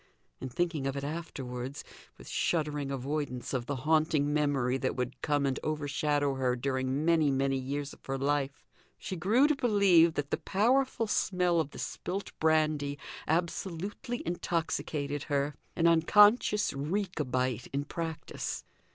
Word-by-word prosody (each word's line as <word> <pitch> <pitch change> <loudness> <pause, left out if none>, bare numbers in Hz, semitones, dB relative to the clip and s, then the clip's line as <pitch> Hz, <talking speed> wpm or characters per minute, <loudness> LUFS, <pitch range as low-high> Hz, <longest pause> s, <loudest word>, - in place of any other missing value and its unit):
In 130 - -5
thinking 160 0 -1
of 135 0 -2
it 140 - -3
afterwards, 135 -4 -5 0.3
with - - -13
shuddering 150 -4 -1
avoidance 140 -1 -3
of 125 -2 -2
the 145 - -1
haunting 155 -2 +2
memory 135 -4 +1
that 130 - -1
would 125 0 -4
come 145 -2 +1
and 135 -1 0
overshadow 145 -1 0
her 130 -2 0
during 130 +2 -1
many, 165 -3 +4
many 135 0 +1
years 140 +2 -4
of - - -18
her 135 0 -1
life, 140 +2 -1 0.3
she 190 - -5
grew 215 - +3
to 305 - +2
believe 200 - +4
that 145 -1 -3
the - - +1
powerful 240 +4 +2
smell 180 -4 +1
of 155 - 0
the - - -12
spilt 195 +2 -4
brandy 155 -2 +2 0.3
absolutely 180 +7 -2
intoxicated 155 -4 -2
her 145 0 0 0.2
an 165 - +1
unconscious 205 +6 +5
Rechabite 140 - -1
in 140 +1 -1
practice. 165 -1 -4
150 Hz, 145 wpm, -30 LUFS, 135-170 Hz, 0.3 s, unconscious